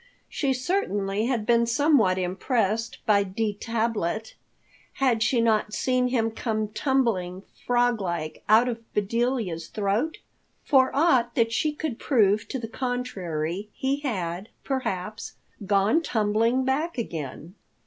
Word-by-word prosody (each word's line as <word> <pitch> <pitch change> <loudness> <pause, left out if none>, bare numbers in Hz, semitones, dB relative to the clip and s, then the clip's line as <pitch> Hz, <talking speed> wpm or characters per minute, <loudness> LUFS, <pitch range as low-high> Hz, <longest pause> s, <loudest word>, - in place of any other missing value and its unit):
She 275 -3 0
certainly 225 - -1
had 240 -5 -1
been 235 0 +3
somewhat 235 -7 +3
impressed 215 +4 -1
by 205 -2 +4
D. 205 +2 -2
Tablet. 220 -2 -2 0.6
Had 250 -5 +1
she 235 +1 +2
not 215 -2 +1
seen 255 -1 +1
him 230 -3 0
come 215 -2 -2
tumbling, 215 -7 0 0.2
frog 245 -2 +2
like, 170 -4 -4
out 225 +3 +6
of 235 -2 -2 0.2
Bedelia's 210 -5 -1
throat? 210 - -1 0.5
For 260 -2 +5
aught 265 -6 +3
that 230 -1 +2
she 300 +6 +1
could 295 -5 -4
prove 210 -5 +2
to 265 - -3
the 230 -3 -5
contrary, 205 -8 -3
he 270 +2 -1
had, 190 - -3
perhaps, 215 -6 -3 0.3
gone 200 - +3
tumbling 230 0 +1
back 295 +5 -1
again. 165 - -5
225 Hz, 130 wpm, -26 LUFS, 200-255 Hz, 0.6 s, out